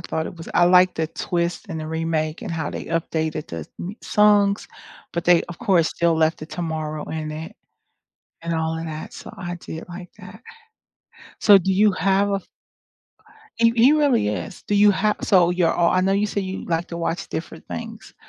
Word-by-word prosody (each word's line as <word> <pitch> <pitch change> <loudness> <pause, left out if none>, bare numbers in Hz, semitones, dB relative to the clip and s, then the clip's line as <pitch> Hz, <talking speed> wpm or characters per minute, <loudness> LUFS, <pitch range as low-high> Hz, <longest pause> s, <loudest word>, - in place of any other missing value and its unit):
thought 160 -1 -3
it - - -8
was 165 - -9
I 175 - +5
like 180 +1 +5
the 160 - -1
twist 170 +3 -3
and 165 -3 -4
the 155 - -5
remake 160 0 -2
and 210 - -6
how 160 -3 -3
they - - -6
updated 160 -2 -2
the 80 -2 -6
m 185 +4 -5
songs, 205 -1 +3 0.5
but 170 - -3
they, 175 -1 +5
of 175 0 -10
course, 185 -8 +3
still 170 -1 +1
left 160 0 +2
the 155 - -8
"Tomorrow" 155 -3 -4
in 155 -1 -4
it 155 +1 -7 0.9
and 170 0 -2
all 160 0 -1
of 165 - -5
that 155 -1 -6
so - - -10
I 175 -2 -5
did 160 -2 -8
like 175 0 -9
that. 185 +5 -12 1.0
So 205 -3 +7
do 190 0 0
you 205 +2 +4
have 195 +2 +1
a - - +2
f 195 - -6 1.1
he 230 0 +4
he 245 +5 +6
really 285 - +3
is, 105 -4 -5
do 205 - -1
you 205 0 +6
have 210 +2 +1
so 180 -3 +4
you're 180 -2 +2
all 170 -1 +2
I 185 - +2
know 190 +1 +2
you 200 +2 +1
say 205 - -2
you 190 0 -5
like 170 0 -1
to 170 - -5
watch 170 +2 -3
different - - -6
things - - -8
175 Hz, 205 wpm, -22 LUFS, 160-195 Hz, 1.1 s, So